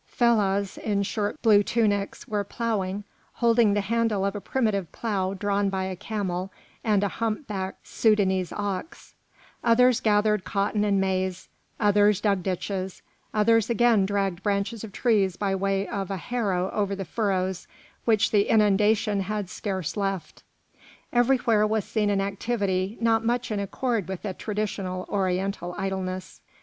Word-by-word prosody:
Fellahs 200 -5 +1
in 200 -2 0
short 205 +6 -2
blue 210 -3 +6
tunics 205 -2 0
were 210 -1 -1
ploughing, 205 -2 -2 0.3
holding 230 -3 +3
the 205 - +2
handle 220 -1 0
of 200 - -1
a 205 - -4
primitive 210 -9 -1
plough 195 -4 -2
drawn 200 0 0
by 190 -1 -2
a 190 0 -3
camel 190 -2 -3 0.3
and 210 -3 +2
a - - +2
humpbacked 210 -2 -4
Soudanese 190 -5 +2
ox; 205 - -5 0.5
others 250 +1 +5
gathered 210 -1 +2
cotton 205 +1 0
and 200 -2 +2
maize; 185 -1 -1 0.3
others 205 -1 +4
dug 200 -3 +1
ditches; 190 +1 -3 0.3
others 225 +1 +3
again 230 -4 +3
dragged 195 -3 -1
branches 205 +2 -1
of 220 - -7
trees 200 -6 +2
by 195 0 -1
way 195 +1 0
of 195 -2 -3
a 195 - -2
harrow 195 -4 -1
over 200 -2 -1
the 195 -1 -5
furrows 190 -3 -1 0.4
which 220 -3 +3
the 205 -1 +3
inundation 210 0 +3
had 200 -1 -3
scarce 190 -6 -3
left. 195 -3 -3 0.7
Everywhere 240 -3 +3
was 215 -1 0
seen 210 -2 0
an 200 -1 +1
activity 200 -1 -1
not 225 -1 +2
much 240 0 -1
in 210 - -1
accord 215 0 -1
with 190 -1 -5
the 200 -3 -3
traditional 195 -3 -3
Oriental 190 -2 -1
idleness. 185 -1 -4
200 Hz, 145 wpm, -26 LUFS, 190-220 Hz, 0.7 s, blue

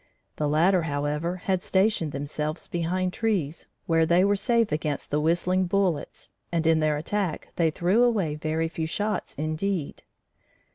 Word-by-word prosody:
The 150 -1 0
latter, 175 +5 +3
however, 150 +2 -2
had 190 -2 0
stationed 190 -6 +1
themselves 150 +3 -4
behind 180 +2 -1
trees, 185 -10 -1 0.2
where 165 -1 +3
they 175 +3 +4
were 200 0 +3
safe 230 0 +1
against 150 -1 -2
the 150 - +2
whistling 180 +3 +1
bullets, 180 -5 -1 0.2
and 165 -1 0
in 160 0 +4
their 155 -1 +1
attack 180 +2 -2
they 165 -2 +3
threw 180 +8 +2
away 210 -11 +2
very 155 +2 -1
few 160 -1 -3
shots 210 +5 -2
indeed. 155 +2 -2
165 Hz, 150 wpm, -26 LUFS, 155-190 Hz, 0.2 s, they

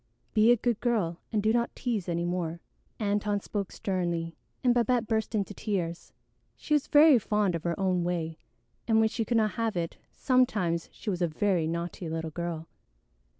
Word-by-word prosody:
Be 220 +1 +5
a 245 - +5
good 235 -1 0
girl 205 -9 0
and 210 -3 0
do 220 +1 +3
not 235 0 0
tease 220 -8 -2
any 170 0 0
more." 175 -2 -2 0.4
Antone 205 -1 0
spoke 200 -1 -4
sternly, 170 -4 -2 0.3
and 245 -1 +5
Babette 240 0 +2
burst 220 0 -1
into 205 -1 -1
tears. 180 -6 -3 0.5
She 300 - -2
was 295 -2 +2
very 295 -3 +7
fond 210 -3 +1
of 165 - -2
her 170 +1 -1
own 185 -2 +1
way, 165 -2 -2 0.5
and 225 -1 +4
when 220 0 +4
she 225 - -2
could 235 +1 +1
not 215 -1 +2
have 225 -4 -2
it, 170 0 -3
sometimes 210 - +1
she 215 - -4
was 180 -1 -3
a 175 - +3
very 170 0 +1
naughty 170 +1 -4
little 160 0 -3
girl. 165 0 -4
200 Hz, 185 wpm, -28 LUFS, 170-225 Hz, 0.5 s, very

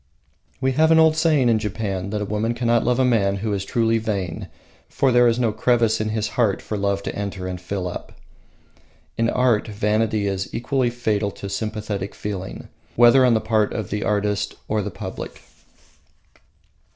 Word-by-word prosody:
We 130 0 +1
have 155 +4 +3
an 160 - +6
old 160 -1 +5
saying 155 -5 +3
in 115 -2 +3
Japan 100 -3 -3
that 105 0 -2
a - - -3
woman 105 +3 -1
cannot 120 -1 +2
love 125 0 +1
a 130 - +3
man 100 -6 +2
who 105 +2 -2
is 100 -1 -2
truly 115 +2 +1
vain, 100 -6 -3 0.4
for 135 -1 +1
their 120 0 +5
is 115 0 +2
no 120 -3 +1
crevice 115 0 +2
in 110 - -1
his 110 -1 -1
heart 110 -3 +1
for 110 - -5
love 100 -1 -1
to - - -4
enter 100 -2 -4
and 90 -1 -5
fill 95 0 -3
up. 90 - -7 1.0
In 115 +4 +1
art 125 -4 +2
vanity 105 0 0
is 95 -1 -2
equally 125 +1 0
fatal 110 -4 -1
to 100 - -7
sympathetic 105 -2 -4
feeling, 95 -2 -6 0.3
whether 120 +3 +6
on 125 -2 +4
the - - +3
part 110 -1 +1
of 110 - -4
the 105 +1 -2
artist 105 -1 -1
or 110 0 0
the - - -4
public. - - -8
110 Hz, 185 wpm, -22 LUFS, 100-120 Hz, 1.0 s, an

